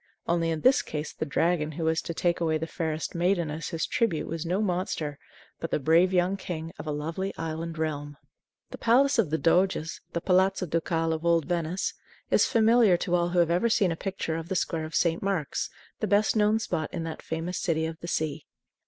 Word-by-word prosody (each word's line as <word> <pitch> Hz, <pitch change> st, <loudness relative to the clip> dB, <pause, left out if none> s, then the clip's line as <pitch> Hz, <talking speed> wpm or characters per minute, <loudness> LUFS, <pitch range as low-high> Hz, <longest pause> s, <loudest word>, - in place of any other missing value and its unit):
Only 165 Hz, -1 st, +1 dB
in 160 Hz, -1 st, -2 dB
this 260 Hz, +1 st, +5 dB
case 150 Hz, 0 st, -5 dB
the 155 Hz, -, -4 dB
dragon 155 Hz, +1 st, +1 dB
who 165 Hz, -, -4 dB
was 160 Hz, 0 st, +1 dB
to 170 Hz, -, -5 dB
take 175 Hz, +1 st, +1 dB
away 160 Hz, -2 st, +1 dB
the 160 Hz, -, -3 dB
fairest 160 Hz, -1 st, -3 dB
maiden 175 Hz, -2 st, +1 dB
as 155 Hz, +2 st, -4 dB
his 160 Hz, -1 st, -1 dB
tribute 205 Hz, -10 st, 0 dB
was 165 Hz, 0 st, -4 dB
no 180 Hz, +3 st, 0 dB
monster, 175 Hz, -7 st, -2 dB, 0.4 s
but 165 Hz, -, -4 dB
the -, -, +1 dB
brave 165 Hz, +6 st, +4 dB
young 185 Hz, +1 st, +2 dB
king 165 Hz, -3 st, -5 dB
of -, -, -7 dB
a -, -, -1 dB
lovely 165 Hz, +6 st, -3 dB
island 165 Hz, 0 st, -4 dB
realm. 145 Hz, -2 st, -3 dB, 0.5 s
The -, -, -8 dB
Palace 265 Hz, +3 st, +4 dB
of 195 Hz, -9 st, +3 dB
the 160 Hz, -, +1 dB
Doges 170 Hz, -1 st, +1 dB
the 170 Hz, -, 0 dB
Palazzo 185 Hz, +1 st, +2 dB
Ducale 165 Hz, 0 st, 0 dB
of 160 Hz, 0 st, -4 dB
old 170 Hz, -2 st, +3 dB
Venice 175 Hz, +1 st, -1 dB, 0.4 s
is -, -, +4 dB
familiar 225 Hz, -5 st, +5 dB
to 175 Hz, -, -3 dB
all 175 Hz, 0 st, +2 dB
who 180 Hz, -, -2 dB
have 170 Hz, -1 st, +4 dB
ever 180 Hz, +7 st, +2 dB
seen 200 Hz, -5 st, +3 dB
a -, -, -1 dB
picture 175 Hz, -3 st, -3 dB
of 165 Hz, +1 st, -6 dB
the 190 Hz, -, -1 dB
Square 165 Hz, -2 st, -1 dB
of 160 Hz, -, -7 dB
St. 170 Hz, -1 st, +2 dB
Mark's, 195 Hz, -7 st, -1 dB, 0.3 s
the 215 Hz, -, -1 dB
best 205 Hz, +3 st, +3 dB
known 210 Hz, 0 st, +4 dB
spot 160 Hz, -7 st, -2 dB
in 170 Hz, -3 st, -4 dB
that 165 Hz, -1 st, -6 dB
famous 165 Hz, +3 st, -3 dB
City 160 Hz, -3 st, 0 dB
of 160 Hz, 0 st, -5 dB
the 170 Hz, -, -7 dB
Sea. 155 Hz, -2 st, -2 dB
170 Hz, 215 wpm, -27 LUFS, 160-185 Hz, 0.5 s, this